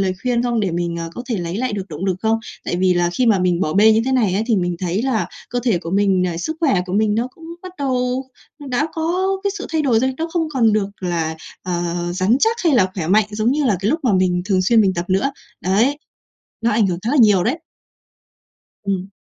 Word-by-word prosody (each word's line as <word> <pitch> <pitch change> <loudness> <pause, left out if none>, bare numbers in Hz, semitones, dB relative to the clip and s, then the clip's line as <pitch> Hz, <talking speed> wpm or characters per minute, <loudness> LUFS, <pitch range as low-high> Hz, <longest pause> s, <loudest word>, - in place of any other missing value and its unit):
lời 190 -1 +1
khuyên 245 -1 +1
không 240 -2 0
để 195 -3 0
mình, 170 0 -2
ờ, 165 0 -4
có 245 - -6
thể 230 - 0
lấy 175 +2 -3
lại 255 +1 -1
được 200 -1 -4
động 155 +3 -5
lực 190 -2 0
không? 225 0 +2 0.3
Tại - - -2
vì 185 0 +2
là 175 0 +1
khi 245 +8 0
mà 215 -4 +4
mình 180 -1 +1
bỏ 155 - 0
bê 215 +5 +6
như 220 - +3
thế 265 - 0
này 220 -8 +2
ấy 205 - +1
thì 225 -4 +2
mình 175 -1 -1
thấy 185 +4 -1
là 260 -5 0 0.2
cơ 245 +1 -1
thể 225 -8 +2
của 165 -1 -7
mình, 195 -1 +2
à, 175 -2 -3
sức 310 - -3
khỏe 270 - +3
của 185 - -6
mình 210 +1 +2
nó 235 +3 0
cũng 330 - -15 0.2
bắt 370 -1 -8
đầu 255 -1 -1 0.4
đã 260 +4 0
có 345 +4 -1 0.2
cái 400 - +2
sự - - -6
thay 320 -1 +1
đổi 240 -6 +3
rồi, 260 +1 0
nó 325 +1 -2
không 330 -3 0
còn 230 -4 +3
được 210 -2 +1
là, 165 -3 -2 0.3
ờ, 175 -1 -2 0.3
rắn 190 +6 +2
chắc 450 +1 +3
hay 315 -5 +4
là 190 -6 +3
khỏe 170 -5 -3
mạnh 205 +2 +4
giống 215 +3 0
như 295 0 0
là 215 -7 +2
cái 200 - 0
lúc 320 - 0
mà 245 - +2
mình 185 -1 +2
thường 190 -1 +1
xuyên 225 +4 +4
mình 195 -3 +2
tập 170 -1 -2
nữa. 195 +9 +1 0.3
Đấy, 225 +10 +2 0.6
nó 235 - +2
ảnh 210 -1 +3
hưởng 175 -2 -2
khá 230 - -1
là 295 - +1
nhiều 205 -5 +5
đấy. 260 +10 0 1.2
Ừm. 195 -1 -2
210 Hz, 260 wpm, -20 LUFS, 185-250 Hz, 1.2 s, bê